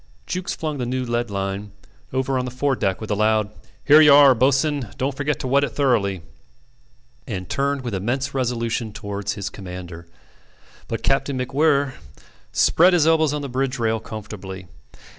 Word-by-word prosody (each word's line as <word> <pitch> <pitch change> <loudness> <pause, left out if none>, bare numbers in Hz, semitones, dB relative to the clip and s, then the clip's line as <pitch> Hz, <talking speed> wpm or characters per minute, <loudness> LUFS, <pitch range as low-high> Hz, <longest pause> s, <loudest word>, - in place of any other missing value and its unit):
Jukes 185 0 -3
flung 155 -3 -4
the 125 - -2
new 130 +1 -1
lead 120 -1 -1
line 100 0 -4 0.4
over 130 0 0
on 125 - -2
the - - -4
fore 135 +2 0
deck 95 -5 -1
with 110 -1 -6
a - - +2
loud 110 0 +1 0.3
"Here 150 +2 +8
you 150 -2 +7
are, 140 -1 +8
bo'ss'en 135 0 +1
don't 135 +1 -1
forget 145 -1 -1
to - - -3
wet 140 +2 +3
it 130 -5 -2
thoroughly," 105 - +1 1.0
and 95 -4 -5
turned 140 +4 -1
with 120 -3 -4
immense 130 +8 -2
resolution 115 -4 -2
towards 100 0 -4
his 100 -2 -5
commander; 90 -3 -9 0.8
but 115 - -4
Captain 135 0 +1
MacWhirr 140 +1 +1 0.6
spread 180 +3 +4
his 170 -4 +4
elbows 160 -2 +3
on 150 -1 -3
the - - -3
bridge 135 +1 -2
rail 115 -1 0
comfortably. 100 -4 -8
125 Hz, 170 wpm, -22 LUFS, 105-140 Hz, 1.0 s, Here